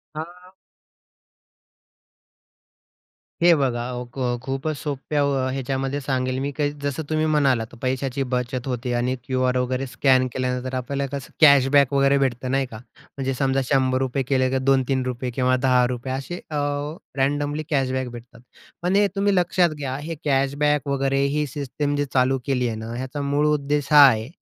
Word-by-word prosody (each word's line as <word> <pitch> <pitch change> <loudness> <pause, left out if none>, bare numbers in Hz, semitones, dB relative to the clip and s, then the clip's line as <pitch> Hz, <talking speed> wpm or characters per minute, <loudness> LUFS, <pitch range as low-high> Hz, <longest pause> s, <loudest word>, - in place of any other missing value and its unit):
हां. 180 +4 -9 2.9
हे 175 0 +7
बघा, 120 -3 0
व 125 0 -4
ख - - -8 0.2
खूपच 135 +4 -3
सोप्या 145 0 -2
व 140 -1 +1 0.2
ह्याच्यामध्ये 135 +1 -2
सांगेल 130 -1 -1
मी 140 +1 -2
काही 145 -1 +1
जसं 145 +2 -2
तुम्ही 155 0 +1
म्हणालात, 135 -7 +1
पैशाची 130 +1 -1
बचत 125 +1 -2
होते 125 -1 -2
आणि 125 +2 0
क्यू-आर 130 0 0
वगैरे 130 +1 -1
स्कॅन 130 0 +3
केल्यानंतर 130 0 -2
आपल्याला 140 +2 -2
कसं 130 - -10
कॅशबॅक 140 -2 +6
वगैरे 140 0 +4
भेटतं 130 -2 -1
नाही 135 0 +1
का? 115 -4 -10
म्हणजे 135 +2 -7
समजा, 135 +1 +1
₹100 130 -1 +1
केले 130 -1 +2
का 135 - +1
₹2-3 130 -2 0
किंवा 130 +1 +1
₹10 125 0 +1
असे 135 +6 -5
अ, 155 - -5 0.6
रँडमली 145 +2 0
कॅशबॅक 130 -3 0
भेटतात. 120 0 -12 0.4
पण 180 +2 0
हे 205 0 +4
तुम्ही 200 0 +2
लक्षात 175 0 +3
घ्या 135 -3 -3
हे 160 +3 -5
कॅशबॅक 145 +1 +1
वगैरे 135 0 0 0.2
ही 150 0 +1
सिस्टीम 145 +1 -3
जी 145 0 0
चालू 130 0 +2
केलीय 125 -4 0
ना, 110 +1 -6
ह्याचा 130 +3 -4
मूळ 140 +1 +1
उद्देश 145 -1 0
हा 145 -1 +10
आहे, 110 -3 +1
135 Hz, 150 wpm, -23 LUFS, 130-145 Hz, 2.9 s, हा